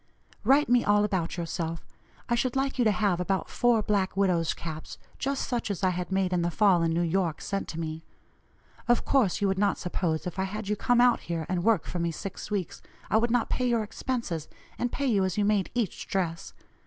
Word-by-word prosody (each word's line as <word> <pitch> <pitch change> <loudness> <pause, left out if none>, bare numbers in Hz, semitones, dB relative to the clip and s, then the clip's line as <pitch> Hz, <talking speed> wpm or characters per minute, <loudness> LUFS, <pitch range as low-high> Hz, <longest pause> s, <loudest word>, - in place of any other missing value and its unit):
Write 285 +3 +4
me 245 0 +4
all 205 0 +4
about 185 -5 -1
yourself. 165 -1 -3 0.4
I 240 - 0
should 245 +1 0
like 270 0 -1
you 245 - +4
to 215 - +5
have 200 -3 +1
about 190 +1 -1
four 240 -3 +3
black 195 -2 0
widow's 180 -4 +2
caps, 160 -1 -7 0.2
just 275 0 -1
such 240 -3 -2
as 195 -3 -3
I 185 - +4
had 180 0 -4
made 190 -1 +1
in 175 - +2
the 170 - +1
fall 185 0 +4
in 165 0 +1
New 170 +1 +1
York, 170 -2 0
sent 195 -1 -3
to 165 - -5
me. 160 0 -4 0.8
Of 240 0 +3
course 235 -9 +2
you 200 - +3
would 190 0 0
not 205 -1 +2
suppose, 175 -3 -2
if 180 +1 -5
I 190 - +1
had 210 +2 -5
you 210 - +1
come 245 +3 +3
out 245 0 +5
here 165 -2 -4
and 180 -1 -1
work 225 0 +3
for 180 - -4
me 170 0 0
six 180 +6 -6
weeks, 200 -4 -3 0.3
I - - +5
would 235 +2 +2
not 240 0 +1
pay 250 - +1
your 235 -2 +2
expenses 210 - -3 0.3
and 245 - 0
pay 280 - -2
you 210 -7 +3
as 185 0 -1
you 205 - +2
made 205 -2 +2
each 230 -6 -2
dress. 170 -4 -2
195 Hz, 230 wpm, -28 LUFS, 175-230 Hz, 0.8 s, to